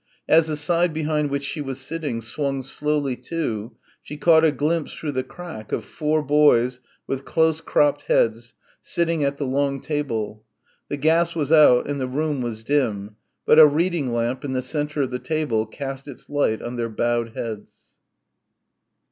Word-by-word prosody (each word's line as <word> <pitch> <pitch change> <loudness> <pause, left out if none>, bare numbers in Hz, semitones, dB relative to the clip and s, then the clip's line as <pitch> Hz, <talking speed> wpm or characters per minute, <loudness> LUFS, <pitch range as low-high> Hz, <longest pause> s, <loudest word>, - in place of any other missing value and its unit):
As 160 0 +5
the 155 -1 -2
side 170 +3 +1
behind 155 -1 0
which 140 0 -2
she 150 +2 -4
was 135 -2 -5
sitting 140 -4 -4
swung 135 +3 -3
slowly 145 0 -1
to, 125 -6 -4 0.3
she 150 - -9
caught 160 0 +5
a 160 - +5
glimpse, 150 +3 -1
through 150 - -4
the 130 -2 -1
crack, 130 - -10
of - - -2
four 155 0 -1
boys 130 -4 +3 0.3
with 135 0 -3
close 160 +1 +1
cropped 145 -2 +1
heads, 115 +1 +1 0.3
sitting 165 -3 0
at 140 0 0
the 140 - -2
long 140 +1 0
table. 115 -8 -3 0.5
The 145 - -2
gas 165 +3 +2
was 150 -3 -1
out 150 -6 +6
and 140 -1 -3
the 130 - -1
room 145 +1 -1
was 115 -2 -4
dim, 110 -7 -1 0.3
but 155 - +6
a 155 - +11
reading 155 -2 0
lamp 120 +2 -1
in 135 -2 -3
the 130 0 -1
centre 150 +1 -1
of 130 - -3
the 125 - -3
table 140 -10 -1
cast 135 +3 -6
its 140 - -11
light 145 -7 0
on 120 +1 -5
their 115 -1 -2
bowed 115 +1 -1
heads. 110 -3 -5
140 Hz, 175 wpm, -23 LUFS, 125-155 Hz, 0.5 s, a